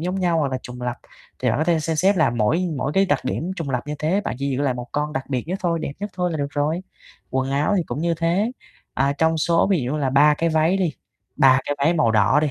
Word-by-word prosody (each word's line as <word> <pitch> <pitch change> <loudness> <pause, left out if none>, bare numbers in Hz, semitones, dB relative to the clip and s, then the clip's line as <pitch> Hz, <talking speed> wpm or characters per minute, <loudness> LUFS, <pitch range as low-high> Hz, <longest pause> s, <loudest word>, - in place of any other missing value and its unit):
giống 180 +3 -2
nhau, 175 -3 +2
hoặc 140 -3 0
là 130 - -1
trùng 125 0 -9
lặp, 125 -1 -2 0.4
thì - - 0
bạn - - 0
có 155 - +1
thể 165 -1 +2
xem 160 0 -2
xét 190 +4 +3
là 155 -7 +3
mỗi 120 +11 +1
mỗi 135 +2 -2
cái 195 +3 +3
đặc 145 -6 +2
điểm 170 +7 -2
trùng 165 -6 -4
lặp 125 0 -2
như 150 - -3
thế, 160 +7 +1
bạn 205 - -4
chỉ 140 0 -2
giữ 130 +1 -1
lại 135 -3 +1
1 120 0 -7
con 150 +1 -1
đặc 135 -3 -3
biệt 125 -2 -1
nhất 185 +2 -2
thôi, 170 -2 +1
đẹp - - -3
nhất 205 0 -4
thôi 180 -1 -1
là - - -2
được 140 - -1
rồi. 150 +5 -1 0.5
Quần 130 +1 -1
áo 145 +9 +1
thì 180 - +2
cũng - - -4
như 170 +2 0
thế, 175 +8 0 0.4
à, 135 +1 +1
trong 160 +1 +2
số 165 +1 +2
ví 180 -7 +3
dụ 125 +3 -2
như - - -1
là 135 -3 0
3 150 +2 +5
cái 165 +3 0
váy 160 +3 +2
đi, 180 -5 0 0.4
3 135 -2 +5
cái 145 - 0
váy 150 +5 +2
màu 150 -8 +3
đỏ 105 +5 +4
đi. 150 -1 0
150 Hz, 295 wpm, -22 LUFS, 135-170 Hz, 0.5 s, 3